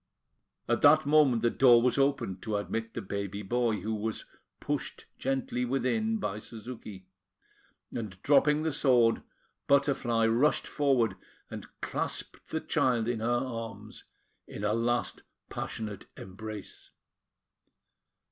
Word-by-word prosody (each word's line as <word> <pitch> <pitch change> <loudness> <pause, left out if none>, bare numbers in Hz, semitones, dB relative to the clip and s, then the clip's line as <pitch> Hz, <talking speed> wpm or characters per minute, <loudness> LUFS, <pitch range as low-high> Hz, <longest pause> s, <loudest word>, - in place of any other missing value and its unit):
At - - +1
that 150 +1 +6
moment, 145 -6 +4
the 120 - +3
door 120 -3 +6
was 125 +3 +2
opened 135 -9 0
to 110 -2 -3
admit 115 +2 -4
the - - -4
baby 100 +1 -4
boy, 115 -1 0
who 110 +3 -2
was 110 +1 -3 0.3
pushed - - -4
gently 135 -2 -1
within 135 - 0
by 105 - -3
Suzuki; 110 -4 -9 0.9
and, 105 -5 -5
dropping 150 +1 +4
the 160 -2 0
sword, 125 -5 +3 0.5
Butterfly 135 -5 +2
rushed 120 +7 +2
forward, 125 -9 +1 0.3
and - - -7
clasped - - -3
her - - 0
child 120 -3 +1
in 120 -2 -1
her 115 +2 -1
arms 115 -4 -4 0.4
in - - -7
a 105 0 +1
last 120 +1 0 0.3
passionate 105 -3 -5
embrace. 105 +1 -8
115 Hz, 125 wpm, -29 LUFS, 110-135 Hz, 0.9 s, that